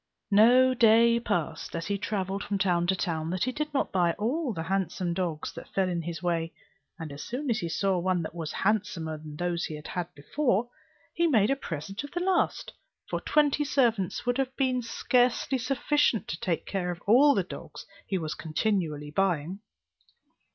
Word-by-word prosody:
No 245 Hz, +5 st, +6 dB
day 235 Hz, 0 st, +5 dB
passed, 175 Hz, -10 st, -2 dB
as 165 Hz, 0 st, -3 dB
he 200 Hz, 0 st, -2 dB
travelled 195 Hz, -1 st, -2 dB
from 205 Hz, -, -2 dB
town 175 Hz, -3 st, +1 dB
to 190 Hz, -, +2 dB
town, 165 Hz, -4 st, -2 dB
that 185 Hz, +1 st, -1 dB
he 255 Hz, -, 0 dB
did 300 Hz, +3 st, -3 dB
not 280 Hz, -, 0 dB
buy 175 Hz, -3 st, +2 dB
all 255 Hz, -, -1 dB
the 160 Hz, -6 st, -4 dB
handsome 185 Hz, -1 st, -1 dB
dogs 170 Hz, -4 st, -3 dB
that -, -, -10 dB
fell 190 Hz, -1 st, +1 dB
in 175 Hz, -2 st, -1 dB
his 170 Hz, +1 st, -6 dB
way; 165 Hz, -2 st, 0 dB, 0.5 s
and 160 Hz, -2 st, -7 dB
as 140 Hz, +1 st, -8 dB
soon 255 Hz, +2 st, -3 dB
as 220 Hz, -, +1 dB
he 170 Hz, -4 st, -3 dB
saw 190 Hz, +2 st, +1 dB
one 180 Hz, -1 st, 0 dB
that 160 Hz, -, -6 dB
was 165 Hz, -3 st, -5 dB
handsomer 190 Hz, -7 st, -1 dB
than 150 Hz, -1 st, -9 dB
those 175 Hz, +1 st, -1 dB
he 155 Hz, -1 st, -6 dB
had 175 Hz, -1 st, -4 dB
before, 240 Hz, -, 0 dB, 0.5 s
he 340 Hz, 0 st, +2 dB
made 225 Hz, -6 st, +3 dB
a -, -, +3 dB
present 195 Hz, -, -5 dB
of 285 Hz, -, -7 dB
the 350 Hz, -, -1 dB
last; 370 Hz, +1 st, 0 dB, 0.4 s
for -, -, -1 dB
twenty 295 Hz, -1 st, +2 dB
servants 235 Hz, -, +1 dB
would 245 Hz, +2 st, 0 dB
have 265 Hz, -1 st, -1 dB
been 255 Hz, -2 st, +1 dB
scarcely 250 Hz, +2 st, +1 dB
sufficient 255 Hz, -2 st, +1 dB
to -, -, -4 dB
take 180 Hz, -8 st, -1 dB
care 185 Hz, -3 st, -2 dB
of 175 Hz, -1 st, -4 dB
all 275 Hz, +7 st, +6 dB
the 195 Hz, -, +2 dB
dogs 175 Hz, -, -9 dB, 0.2 s
he 195 Hz, -, 0 dB
was 155 Hz, -3 st, -3 dB
continually 155 Hz, -3 st, -2 dB
buying. 180 Hz, 0 st, 0 dB
195 Hz, 190 wpm, -28 LUFS, 170-245 Hz, 0.5 s, No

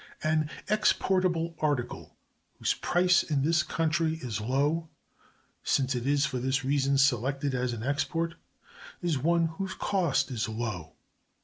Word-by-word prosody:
An 155 Hz, -1 st, +1 dB, 0.2 s
exportable 185 Hz, -5 st, +1 dB
article 145 Hz, -6 st, -2 dB, 0.4 s
whose -, -, +1 dB
price 180 Hz, 0 st, +3 dB
in 145 Hz, -4 st, -1 dB
this 160 Hz, +1 st, +3 dB
country 160 Hz, 0 st, 0 dB
is 120 Hz, -9 st, -4 dB
low—since 140 Hz, 0 st, -2 dB
it 125 Hz, 0 st, -3 dB
is 145 Hz, 0 st, +3 dB
for 125 Hz, -, -2 dB
this 130 Hz, +1 st, 0 dB
reason 140 Hz, 0 st, +2 dB
selected 135 Hz, +1 st, +2 dB
as 125 Hz, -1 st, 0 dB
an 115 Hz, -2 st, -5 dB
export—is 165 Hz, +2 st, -4 dB
one 170 Hz, +4 st, +2 dB
whose 190 Hz, +4 st, -4 dB
cost 145 Hz, -9 st, 0 dB
is 115 Hz, -3 st, -2 dB
low. 110 Hz, -8 st, -4 dB
145 Hz, 125 wpm, -29 LUFS, 130-165 Hz, 0.4 s, price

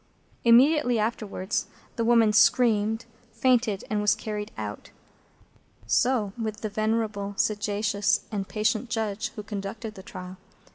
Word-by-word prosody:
Immediately 245 Hz, +2 st, +5 dB
afterwards 215 Hz, -2 st, -2 dB, 0.3 s
that 230 Hz, -, -1 dB
woman 230 Hz, -2 st, +4 dB
screamed, 225 Hz, -1 st, +3 dB, 0.3 s
fainted, 240 Hz, -6 st, +2 dB
and 210 Hz, -1 st, -1 dB
was 210 Hz, -, +3 dB
carried 210 Hz, -1 st, -5 dB
out. 105 Hz, -1 st, -6 dB, 1.0 s
So 215 Hz, -, +1 dB
with 215 Hz, -1 st, -4 dB
the 215 Hz, -, -2 dB
venerable, 215 Hz, -1 st, -1 dB
sagacious, 205 Hz, -1 st, +1 dB
and 200 Hz, -3 st, -3 dB
patient 215 Hz, +2 st, -1 dB
Judge 220 Hz, -1 st, -2 dB
who 210 Hz, -, -6 dB
conducted 210 Hz, +1 st, -6 dB
the 190 Hz, -, -11 dB
trial. 185 Hz, 0 st, -9 dB
215 Hz, 125 wpm, -26 LUFS, 205-230 Hz, 1.0 s, Immediately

